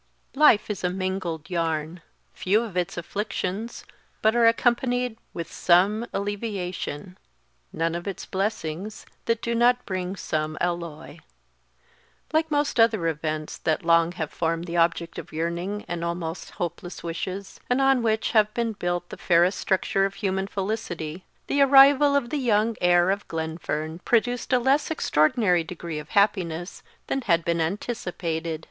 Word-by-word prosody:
_ - - -24
"LIFE 225 -9 +5
is 200 - -5
a 180 - +2
mingled 185 -4 -3
yarn;" 165 -1 -2 0.3
few 210 +5 +1
of 215 -6 -8
its 180 -1 -1
afflictions 200 +4 -4 0.4
but 220 +2 +4
are 235 -1 +5
accompanied 245 +1 +1 0.2
with 165 -1 -6
some 200 +6 +3
alleviation 195 -5 -4 0.5
none 165 0 -1
of 175 +3 -5
its 195 - -5
blessings 195 -1 -3 0.2
that 230 -1 0
do 235 - -1
not 245 +1 +3
bring 185 0 -3
some 155 -4 -2
alloy. 170 -3 -4 1.1
Like 315 0 +2
most 290 -4 0
other 225 -6 +4
events 155 -1 -3
that 160 +1 -1
long 170 0 +4
have 160 -4 -4
formed 165 0 -1
the 170 -1 -5
object 170 0 +1
of - - -10
yearning 170 +6 -3
and 170 -1 -4
almost 170 0 -4
hopeless 175 +1 -5
wishes, 185 +3 -5
and 250 +2 +2
on 270 -2 +4
which 220 -1 0
have 215 -2 +4
been 235 -2 0
built 175 -2 -3
the - - -8
fairest 175 +2 +3
structure 195 0 +1
of 195 0 -4
human 190 -2 -1
felicity, 190 -5 -4 0.2
the 285 - +1
arrival 280 +1 +7
of 250 -4 0
the 300 - 0
young 225 -2 +2
heir 175 +1 +4
of 200 +1 -3
Glenfern 160 0 -4
produced 245 +4 0
a 255 - +5
less 265 +4 +2
extraordinary 180 - +2
degree 165 -2 -6
of 150 - -10
happiness 180 -4 +1 0.2
than 270 - -1
had 170 -7 +1
been 170 -1 +1
anticipated. 170 -4 -3
185 Hz, 155 wpm, -25 LUFS, 170-225 Hz, 1.1 s, arrival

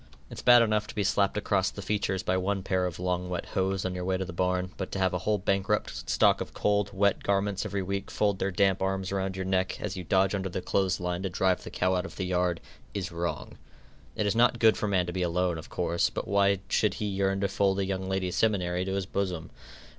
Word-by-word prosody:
It's - - -7
bad 120 -1 +7
enough 105 -2 +1
to - - -9
be 105 - 0
slapped 100 +1 +1
across 100 -2 +1
the 100 - -8
features 95 -2 -1
by 90 - +1
one 95 +1 -1
pair 95 -1 +1
of 90 - -6
long 90 0 -1
wet 90 -1 -3
hose 95 0 -1
on 95 - -1
your 90 0 -4
way 95 +1 0
to 95 - -3
the 90 - -7
barn, 90 +1 0
but 95 - -5
to - - -2
have 95 -1 +1
a 90 - 0
whole 105 +4 +1
bankrupt 95 0 -1
stock - - +4
of - - -6
cold, 105 -1 +1
wet 100 0 +2
garments 100 +1 0
every 100 -1 -2
week 100 +1 -3
fold 100 -2 0
their 95 - 0
damp 95 0 +2
arms 95 0 -1
around 95 -1 -2
your 95 -1 -3
neck, 95 0 0
as 105 -1 -4
you 90 - -5
dodge 95 +3 +2
under 95 -1 -2
the 90 - -3
clothes 95 +1 0
line 90 0 -2
to 95 - -2
drive 95 +1 +1
the - - -7
cow 90 +1 0
out 90 +1 -1
of - - -12
the 95 - -3
yard, 90 -2 0 0.3
is 95 -3 -3
wrong. 85 +1 -4 0.6
It 105 - 0
is 100 - +1
not 120 +1 +4
good 110 -1 +5
for 105 - -2
man 95 -3 +2
to 90 - -5
be 95 - -2
alone, 90 -1 0
of 80 - -11
course, 85 -1 0
but - - -5
why 100 -1 +3
should 105 -3 +1
he 105 - -3
yearn 95 -1 0
to 100 - +2
fold 100 0 +1
a 100 - 0
young 95 0 -3
ladies' 95 -2 -1
seminary 90 -5 +1
to 95 - -2
his 100 -1 -1
bosom? 90 -4 -3
95 Hz, 250 wpm, -28 LUFS, 90-100 Hz, 0.6 s, bad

